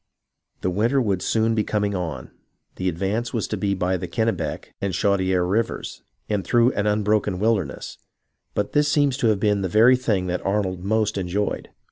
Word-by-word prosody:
The 90 - 0
vvinter 115 +9 +2
would 100 -4 0
soon 115 0 +1
be 110 -1 +1
coming 105 -1 -1
on, 80 -9 -4 0.5
the 95 0 0
advance 100 +8 -2
was 110 - -1
to - - -1
be 100 -1 0
by 95 0 0
the 90 - -5
Kennebec 110 -6 -2
and 100 -2 -1
Chaudiere 95 -2 +1
rivers, 110 +6 -2 0.3
and 105 -2 -1
through 120 +7 +3
an 105 -3 -1
unbroken 105 -2 +1
wilderness; 100 - -1 0.6
but 105 - -1
this 150 0 +2
seems 145 -3 +3
to 120 - +1
have 105 -3 +2
been 105 -1 +2
the 95 - -1
very 115 +7 +6
thing 105 -7 0
that 90 0 -2
Arnold 95 -2 -1
most 105 0 0
enjoyed. 95 +3 -2
100 Hz, 180 wpm, -23 LUFS, 95-110 Hz, 0.6 s, very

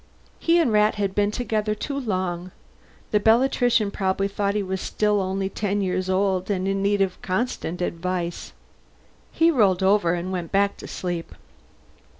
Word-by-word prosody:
He 335 +1 +3
and 325 -9 +3
Rat 210 0 +3
had 200 -2 -1
been 205 0 +2
together 215 -2 -1
too 280 +6 -4
long. 185 -6 -2 0.6
The 210 - +3
Bellatrician 235 -1 +3
probably 195 0 0
thought 200 0 -1
he 210 - 0
was 190 0 -3
still 210 -1 +1
only 190 +1 -1
ten 205 +1 -2
years 185 -1 -1
old 190 0 +1
and 190 -2 0
in 195 0 0
need 200 0 +1
of 190 -2 -1
constant 185 -4 -2
advice. 175 0 -3 0.8
He 330 +1 +3
rolled 200 - +3
over 190 -3 +3
and 175 +2 -4
went 175 -3 -4
back 200 0 +2
to - - -9
sleep. 175 -2 -5
195 Hz, 160 wpm, -24 LUFS, 185-210 Hz, 0.8 s, He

